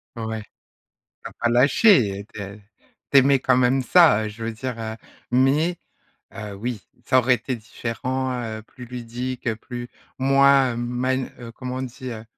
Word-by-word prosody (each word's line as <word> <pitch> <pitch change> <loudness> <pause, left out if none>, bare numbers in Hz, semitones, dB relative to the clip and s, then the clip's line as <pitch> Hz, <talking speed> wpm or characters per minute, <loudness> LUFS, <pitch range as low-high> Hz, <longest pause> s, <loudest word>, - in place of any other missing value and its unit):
Ouais, 110 -1 -4
tu - - -22 0.6
as - - -15
pas 120 - +2
lâché, 120 - +4
tu 105 - -8
ai 100 +1 -8 0.5
tu 140 - +8
aimais 135 +1 +5
quand 130 -1 +3
même 130 +1 +3
ça, 145 -9 +5
heu, - - -3
je 110 +2 -10
veux 115 - -1
dire, 125 +2 -5
heu, 110 0 -5 0.3
mais, 145 +7 +2 0.6
heu, 105 -3 -7
oui, 115 0 -4 0.2
ça 130 - +4
aurait 125 0 +4
été 120 +2 -3
différent 125 +3 -3
heu, 110 -1 -5
plus 125 +2 -12
ludique, 125 +1 -6
heu 110 - 0
plus 120 +1 -7 0.3
moins, 135 -1 +4
hem 120 +1 -3
man 130 +2 -1
heu, 115 -1 -9
comment 125 +1 -6
on 130 - -3
dit? 130 0 -7
Heu 110 -1 -7
125 Hz, 180 wpm, -23 LUFS, 115-130 Hz, 0.6 s, tu